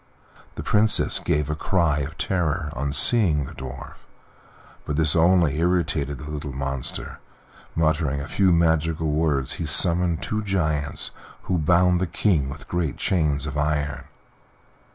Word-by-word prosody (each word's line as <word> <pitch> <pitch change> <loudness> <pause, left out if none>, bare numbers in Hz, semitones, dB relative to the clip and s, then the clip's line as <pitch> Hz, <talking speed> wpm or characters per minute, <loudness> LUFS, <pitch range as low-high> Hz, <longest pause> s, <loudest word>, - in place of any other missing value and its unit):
The - - -6
Princess 105 +1 +3
gave 75 -4 0
a 75 - -2
cry 80 -2 +1
of 70 +2 -5
terror 85 -4 -1
on 70 +3 -3
seeing 75 - +3
the - - -9
Dwarf, 65 0 -9 0.9
but 75 - -3
this 75 -1 +2
only 85 -3 +3
irritated 80 -5 0
the 75 +4 -8
little 75 -1 -5
monster; 70 -1 -4 0.6
muttering 80 -3 +1
a 70 - -6
few 95 +1 +2
magical 80 -1 +1
words 75 -4 0
he 80 - -4
summoned 85 +1 +2
two 110 0 -2
giants, 75 -8 -2 0.3
who 90 -2 -1
bound 90 +3 +3
the 95 - 0
King 80 -7 +1
with 70 +1 -9
great 85 -7 -2
chains 75 -6 0
of 75 -1 -3
iron. 75 -2 -1
80 Hz, 145 wpm, -23 LUFS, 75-85 Hz, 0.9 s, Princess